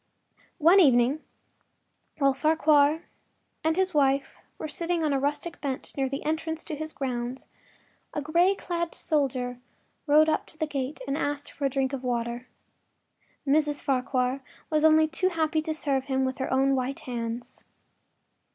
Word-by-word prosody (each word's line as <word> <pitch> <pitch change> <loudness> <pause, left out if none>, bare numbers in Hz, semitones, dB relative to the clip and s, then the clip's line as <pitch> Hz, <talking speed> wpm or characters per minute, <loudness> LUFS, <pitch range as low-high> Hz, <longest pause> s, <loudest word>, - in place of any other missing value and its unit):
One 345 +5 +6
evening 265 -2 +4 0.9
while 275 -2 +3
Farquhar 305 +1 +3 0.6
and 320 0 +2
his 375 0 +1
wife 275 -2 +1 0.2
were - - -5
sitting 335 +2 -2
on 300 -2 +1
a 275 - +1
rustic 295 +5 -3
bench 270 -3 -4
near 270 -1 0
the 275 +1 -5
entrance 320 +1 -2
to 315 - -5
his 315 +1 -5
grounds, 255 -2 -4 0.7
a - - -3
gray 340 +6 +3
clad 340 -3 -3
soldier 255 -5 -1 0.5
rode 305 +2 +6
up 315 - 0
to 315 - -12
the 315 - 0
gate 275 -1 -4
and 275 - -1
asked 290 -1 -2
for 285 - -4
a - - +3
drink 270 0 -1
of 265 -1 -4
water. 240 0 -2 1.0
Mrs. 295 0 +2
Farquhar 255 0 0 0.3
was 305 0 +2
only 315 0 +6
too 350 +4 0
happy 315 -2 0
to 315 0 -3
serve 280 -4 0
him 265 -1 0
with 260 +1 -3
her 265 - -2
own 270 +1 +3
white 260 +1 -2
hands. 240 0 -5
285 Hz, 160 wpm, -27 LUFS, 265-315 Hz, 1.0 s, One